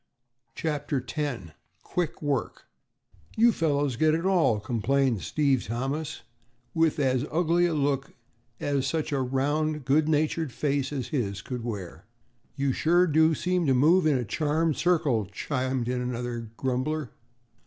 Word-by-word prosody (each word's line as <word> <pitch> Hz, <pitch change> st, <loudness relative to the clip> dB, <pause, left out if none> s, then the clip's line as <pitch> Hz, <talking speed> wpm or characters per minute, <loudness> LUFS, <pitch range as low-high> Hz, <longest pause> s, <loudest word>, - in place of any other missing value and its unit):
CHAPTER 145 Hz, -4 st, -2 dB
X 125 Hz, -, -3 dB, 0.3 s
QUICK 175 Hz, -3 st, -3 dB
WORK 140 Hz, -4 st, -2 dB, 0.7 s
"You 235 Hz, +2 st, +6 dB
fellows 145 Hz, -, 0 dB
get 155 Hz, +2 st, +3 dB
it 165 Hz, +2 st, -2 dB
all," 165 Hz, -, +3 dB
complained 120 Hz, +1 st, 0 dB
Steve 140 Hz, -5 st, +1 dB
Thomas, 135 Hz, +7 st, -3 dB, 0.5 s
with 160 Hz, -1 st, +2 dB
as 130 Hz, -3 st, +1 dB
ugly 175 Hz, +2 st, +2 dB
a 165 Hz, -, -1 dB
look 140 Hz, -2 st, -1 dB, 0.4 s
as 140 Hz, -2 st, 0 dB
such 155 Hz, +1 st, -2 dB
a 140 Hz, -2 st, 0 dB
round 145 Hz, +3 st, -1 dB
good 150 Hz, +3 st, +3 dB
natured 155 Hz, -1 st, +1 dB
face 140 Hz, +1 st, -1 dB
as 130 Hz, -4 st, -4 dB
his 100 Hz, -9 st, -2 dB
could 125 Hz, -3 st, -5 dB
wear. 105 Hz, -7 st, -6 dB, 0.5 s
"You 140 Hz, -1 st, 0 dB
sure 175 Hz, +6 st, +3 dB
do 160 Hz, 0 st, +3 dB
seem 180 Hz, 0 st, 0 dB
to 135 Hz, -, +4 dB
move 155 Hz, +6 st, +4 dB
in 145 Hz, -3 st, +3 dB
a 125 Hz, -, -2 dB
charmed 155 Hz, +6 st, 0 dB
circle," 150 Hz, -, +1 dB
chimed 130 Hz, +3 st, -2 dB
in 125 Hz, 0 st, -1 dB
another 120 Hz, -2 st, -4 dB
grumbler. 130 Hz, +2 st, -2 dB
140 Hz, 145 wpm, -27 LUFS, 125-155 Hz, 0.7 s, You